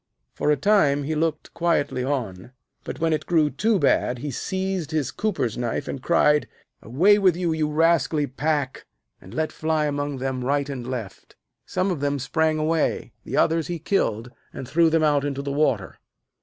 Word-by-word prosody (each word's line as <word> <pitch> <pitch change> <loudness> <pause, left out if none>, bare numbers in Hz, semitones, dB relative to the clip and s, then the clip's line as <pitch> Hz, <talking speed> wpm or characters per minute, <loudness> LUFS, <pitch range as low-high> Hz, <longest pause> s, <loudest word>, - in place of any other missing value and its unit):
For - - -1
a 150 - +4
time 145 -5 +3
he 155 +3 -2
looked 155 0 -2
quietly 165 -6 0
on, 125 -6 -3 0.3
but - - -6
when 165 0 +1
it 155 - -2
grew 155 -4 +3
too 210 - +1
bad 135 -5 +2
he 145 +4 -5
seized 190 +2 -3
his 155 -4 -1
cooper's 140 - -2
knife, 120 +3 -2
and 135 - -5
cried: 150 -1 +3 0.3
'Away 185 - +4
with 185 -4 +4
you, 175 -2 0
you 155 -1 0
rascally 155 -2 +2
pack,' 145 0 -2 0.3
and 95 - -13
let 155 +7 -2
fly 155 -1 0
among 145 -1 -2
them 130 -1 -3
right 140 +2 0
and 125 -3 -5
left. 115 -7 -7 0.3
Some 185 +1 0
of 170 - -2
them 145 0 0
sprang 155 +4 0
away, 155 +1 0
the - - -3
others 165 -1 +2
he 175 - -3
killed, 120 - -1 0.2
and 130 - -7
threw 165 +4 +3
them 160 0 +2
out 145 -2 +3
into 140 -1 -3
the 140 - -3
water. 130 -9 0
150 Hz, 185 wpm, -24 LUFS, 135-165 Hz, 0.3 s, a